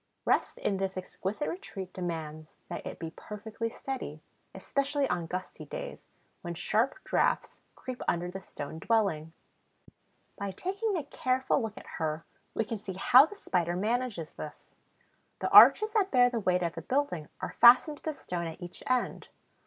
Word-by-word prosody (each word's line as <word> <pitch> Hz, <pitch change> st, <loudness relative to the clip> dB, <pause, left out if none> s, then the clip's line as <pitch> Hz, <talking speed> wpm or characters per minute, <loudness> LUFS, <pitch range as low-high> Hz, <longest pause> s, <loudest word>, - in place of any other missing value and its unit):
Rest -, -, +1 dB
in 195 Hz, -, 0 dB
this 190 Hz, 0 st, -2 dB
exquisite 190 Hz, +7 st, -3 dB
retreat 195 Hz, -, -6 dB
demands 160 Hz, -3 st, -5 dB, 0.2 s
that -, -, -5 dB
it -, -, -6 dB
be 165 Hz, -1 st, -6 dB
perfectly 220 Hz, +2 st, -5 dB
steady, 235 Hz, -, -5 dB, 0.4 s
especially 280 Hz, 0 st, 0 dB
on 175 Hz, -2 st, -1 dB
gusty 185 Hz, +2 st, -5 dB
days, -, -, -7 dB, 0.3 s
when 175 Hz, -2 st, -5 dB
sharp 220 Hz, +8 st, +1 dB
draughts -, -, 0 dB
creep 255 Hz, -1 st, -7 dB
under 175 Hz, +1 st, +1 dB
the 190 Hz, +1 st, -6 dB
stone 160 Hz, -3 st, -7 dB
dwelling. 180 Hz, -8 st, +1 dB, 1.1 s
By 200 Hz, -1 st, -3 dB
taking 390 Hz, -, -1 dB
a 315 Hz, -, -2 dB
careful 260 Hz, -1 st, 0 dB
look 220 Hz, -2 st, -4 dB
at -, -, -10 dB
her 155 Hz, 0 st, -2 dB, 0.3 s
we 225 Hz, -, +1 dB
can 225 Hz, 0 st, -4 dB
see 195 Hz, -2 st, -6 dB
how 250 Hz, +9 st, +7 dB
the 415 Hz, -, -10 dB
Spider 175 Hz, -, -1 dB
manages 215 Hz, -4 st, -1 dB
this. 150 Hz, -, -10 dB, 0.6 s
The -, -, -2 dB
arches 430 Hz, 0 st, +9 dB
that 415 Hz, -3 st, +2 dB
bear 245 Hz, -4 st, +5 dB
the 235 Hz, -, -1 dB
weight 180 Hz, -3 st, +1 dB
of 170 Hz, -1 st, -1 dB
the -, -, -6 dB
building 255 Hz, -, -1 dB
are -, -, -4 dB
fastened 250 Hz, +5 st, +8 dB
to -, -, -20 dB
the 315 Hz, -, -2 dB
stone 175 Hz, -8 st, -4 dB
at 160 Hz, -, -8 dB
each 175 Hz, -1 st, -8 dB
end. 255 Hz, -1 st, 0 dB
200 Hz, 170 wpm, -30 LUFS, 175-255 Hz, 1.1 s, arches